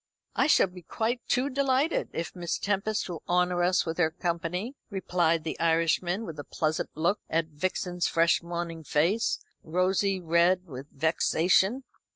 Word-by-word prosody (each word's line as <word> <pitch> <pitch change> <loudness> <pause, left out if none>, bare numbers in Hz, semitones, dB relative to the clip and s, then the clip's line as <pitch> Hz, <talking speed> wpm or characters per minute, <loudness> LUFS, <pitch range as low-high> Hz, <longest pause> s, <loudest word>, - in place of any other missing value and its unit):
"I - - +3
shall 310 - +5
be 180 -1 -11
quite 230 +8 -2
too 255 +2 +2
delighted, 275 +3 +1
if 165 - -4
Miss 170 -2 -2
Tempest 205 +2 -1
will 175 -3 -6
honour 180 0 +2
us 180 +1 +2
with 165 +1 -4
her 160 -2 +4
company," 175 - -3 0.2
replied 175 -5 +1
the 160 - -4
Irishman, 170 +5 +1
with 160 -6 -7
a - - -4
pleasant 155 +1 -2
look 170 +7 +1
at 165 0 0
Vixen's 180 +3 -2
fresh 165 0 +3
morning 170 -1 -5
face, 175 +10 +1 0.2
rosy 185 +3 +1
red 175 +2 +2
with 135 -4 -9
vexation. 180 - +2
175 Hz, 155 wpm, -28 LUFS, 165-195 Hz, 0.2 s, shall